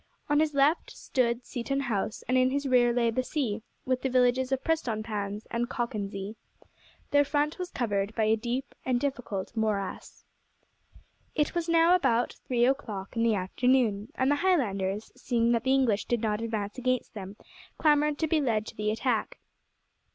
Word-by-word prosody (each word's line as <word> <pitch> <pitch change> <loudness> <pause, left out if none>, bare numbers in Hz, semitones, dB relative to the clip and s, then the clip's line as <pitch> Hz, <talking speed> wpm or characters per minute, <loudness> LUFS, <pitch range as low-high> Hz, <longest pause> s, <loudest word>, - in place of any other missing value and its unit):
On 295 0 +4
his 305 -2 +1
left 285 +4 +3
stood 240 -1 -1
Seaton 275 +2 -2
House, 220 -5 -2
and 255 - +1
in 255 0 +4
his 280 +2 -1
rear 245 -2 +4
lay 235 -1 +2
the 255 - 0
sea, 255 -6 -2 0.2
with 255 -1 0
the 265 - 0
villages 255 +1 +2
of 265 -1 0
Prestonpans 215 -8 -2
and 235 +1 -1
Cockenzie. 205 -3 -4 0.7
Their 285 0 +5
front 295 +3 0
was 360 -1 -3
covered 205 - -1
by 225 - +1
a 215 +1 +4
deep 245 +4 -3
and 250 -2 +1
difficult 245 -8 -3
morass. 210 -3 -3 1.1
It 300 -2 +1
was 340 -1 -2
now 335 +1 +5
about 245 -10 +2
three 240 -2 +3
o'clock 220 -8 -2
in 230 - 0
the 230 -2 +3
afternoon, 215 +2 +1
and 260 +2 +2
the 290 - +3
Highlanders, 215 - 0
seeing 235 -1 +1
that 235 +1 +1
the 260 - +3
English 235 -6 +2
did 240 -2 0
not 215 -1 0
advance 220 -1 -3
against 255 0 -1
them, 195 -2 -7 0.4
clamoured 300 -1 +3
to 320 - 0
be 310 0 +2
led 220 -5 0
to - - -9
the 210 0 -1
attack. 225 +1 -1
240 Hz, 175 wpm, -28 LUFS, 215-275 Hz, 1.1 s, Their